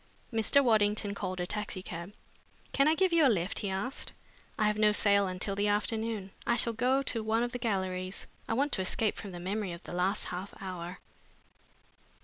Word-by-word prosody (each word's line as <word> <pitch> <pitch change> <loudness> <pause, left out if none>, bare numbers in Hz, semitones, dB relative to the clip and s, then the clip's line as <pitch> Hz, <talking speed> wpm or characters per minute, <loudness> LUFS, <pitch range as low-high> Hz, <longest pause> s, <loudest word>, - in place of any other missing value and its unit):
Mr. 225 +5 +4
Waddington 210 -3 +2
called 185 -2 -4
a 180 - 0
taxicab. 185 -2 -4 0.6
"Can 275 +1 +4
I 315 - +5
give 370 0 +2
you 330 -2 +5
a 275 - +7
lift?" 185 -4 0
he 200 - -2
asked. 195 +8 -3 0.4
"I 215 - +1
have 210 0 +2
no 210 0 +5
sale 200 -1 +4
until 185 +2 -2
the 205 +1 +1
afternoon. 210 -1 -1 0.2
I 235 - +4
shall 235 0 +2
go 255 +4 +2
to 230 -4 -1
one 225 +2 +2
of 240 - -2
the 245 - -4
galleries. 190 -4 -2 0.2
I 225 - +1
want 280 +4 +1
to - - 0
escape 210 +3 +1
from 200 - -7
the 175 - -7
memory 190 +1 -2
of 170 - -9
the - - -8
last 185 +3 +1
half 180 +3 -5
hour!" 180 -1 -6
205 Hz, 195 wpm, -31 LUFS, 185-230 Hz, 0.6 s, a